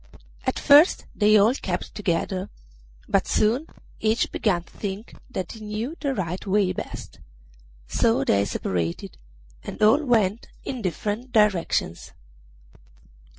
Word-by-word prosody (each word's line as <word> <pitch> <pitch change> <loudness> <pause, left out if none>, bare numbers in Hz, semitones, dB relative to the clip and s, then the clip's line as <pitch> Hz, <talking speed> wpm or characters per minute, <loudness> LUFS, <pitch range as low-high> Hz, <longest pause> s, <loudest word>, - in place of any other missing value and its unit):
At - - 0
first 295 +5 +6
they 215 0 +5
all 210 +4 +5
kept 185 -9 -4
together, 185 0 -2 0.6
but - - +1
soon 240 +9 +1 0.3
each 220 +1 +1
began 180 -6 0
to - - -22
think 200 +2 -6 0.2
that 190 -8 -4
he 225 - -10
knew 215 +7 -4
the 275 -3 -1
right 180 -2 -3
way 195 -1 +2
best; - - -7 0.7
so 230 - +2
they 100 0 +2
separated, 85 -8 -3 0.4
and - - -8
all 225 +9 +5
went 220 -5 +1 0.2
in 255 -3 -5
different 210 +6 -3
directions. 200 - +1
210 Hz, 125 wpm, -24 LUFS, 185-235 Hz, 0.7 s, first